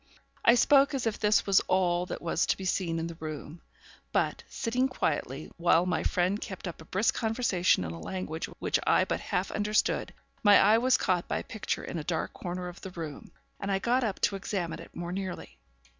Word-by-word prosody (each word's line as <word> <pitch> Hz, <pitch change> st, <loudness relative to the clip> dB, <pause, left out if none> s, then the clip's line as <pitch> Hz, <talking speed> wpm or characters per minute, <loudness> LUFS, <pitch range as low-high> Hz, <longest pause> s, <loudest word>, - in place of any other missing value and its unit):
I 235 Hz, -, +7 dB
spoke 280 Hz, +3 st, +5 dB
as 260 Hz, -, -2 dB
if 225 Hz, -2 st, -1 dB
this 210 Hz, 0 st, +3 dB
was 195 Hz, -1 st, +5 dB
all 180 Hz, -1 st, +2 dB
that -, -, -6 dB
was 170 Hz, 0 st, +1 dB
to -, -, +1 dB
be 190 Hz, -, -6 dB
seen 175 Hz, -3 st, 0 dB
in 165 Hz, -, -2 dB
the 165 Hz, -1 st, -7 dB
room; 155 Hz, +1 st, -7 dB, 0.5 s
but, -, -, 0 dB
sitting 250 Hz, +2 st, 0 dB
quietly, 255 Hz, -, -2 dB
while 170 Hz, 0 st, +4 dB
my 180 Hz, -, 0 dB
friend 185 Hz, +4 st, 0 dB
kept 190 Hz, -2 st, -6 dB
up 170 Hz, -2 st, -7 dB
a -, -, -12 dB
brisk 195 Hz, +7 st, +1 dB
conversation 220 Hz, -, +1 dB
in 80 Hz, -, -4 dB
a 85 Hz, -, -7 dB
language 165 Hz, -, -4 dB
which -, -, 0 dB
I -, -, +4 dB
but -, -, -2 dB
half -, -, -2 dB
understood, 210 Hz, 0 st, 0 dB, 0.3 s
my 205 Hz, -1 st, +7 dB
eye 215 Hz, +3 st, +5 dB
was 255 Hz, +2 st, +4 dB
caught 180 Hz, -2 st, 0 dB
by -, -, -1 dB
a -, -, -4 dB
picture 220 Hz, -, -4 dB
in 170 Hz, -, -4 dB
a -, -, -5 dB
dark 160 Hz, 0 st, -2 dB
corner 180 Hz, 0 st, -5 dB
of 175 Hz, +1 st, -9 dB
the 190 Hz, -, -6 dB
room, 165 Hz, -5 st, -7 dB, 0.3 s
and 200 Hz, 0 st, -3 dB
I 195 Hz, -, +2 dB
got 245 Hz, +6 st, +1 dB
up 210 Hz, -4 st, -2 dB
to 200 Hz, -, +2 dB
examine 175 Hz, -4 st, -3 dB
it 165 Hz, -, -12 dB
more 175 Hz, 0 st, -4 dB
nearly. 190 Hz, -1 st, -5 dB
185 Hz, 215 wpm, -29 LUFS, 170-215 Hz, 0.5 s, I